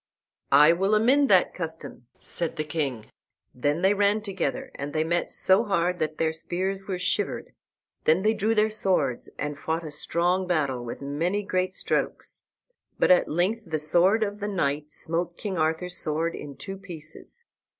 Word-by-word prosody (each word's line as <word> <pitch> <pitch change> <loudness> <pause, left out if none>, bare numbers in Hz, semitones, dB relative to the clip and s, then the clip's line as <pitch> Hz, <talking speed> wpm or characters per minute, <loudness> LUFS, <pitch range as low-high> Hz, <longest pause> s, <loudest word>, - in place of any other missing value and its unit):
"I 150 +3 +8
will 195 +4 +2
amend 265 +6 +4
that 185 -2 +4
custom," 160 -7 -7
said 170 -2 -4
the 155 - -2
king. 145 -7 -3 0.4
Then 145 +7 -1
they 195 +1 +5
ran 205 +1 +2
together, 190 -9 -3
and 140 +1 -6
they 155 - +1
met 170 +2 -1
so 190 +4 +4
hard 180 -4 0
that 155 0 -2
their 160 -1 +1
spears 190 +4 -3
were 190 -2 -2
shivered. 180 - -1 0.5
Then 165 +4 +4
they 215 +1 +4
drew 225 +1 0
their 215 0 +3
swords 180 - 0
and 150 0 -4
fought 160 +2 -2
a 155 - -6
strong 175 +5 0
battle, 140 -8 0
with 120 +3 -7
many 170 +9 -1
great 185 -1 -1
strokes. - - -2 0.5
But - - +4
at 180 - +5
length 185 +8 +1
the 155 - -1
sword 180 +8 +3
of 205 0 -3
the 205 - -3
knight 150 -6 -1
smote 170 +2 -2
King 195 -5 -3
Arthur's 160 +3 0
sword 160 +2 -1
in 145 -2 -8
two 195 0 -7
pieces. 175 - -8
175 Hz, 170 wpm, -26 LUFS, 155-195 Hz, 0.5 s, I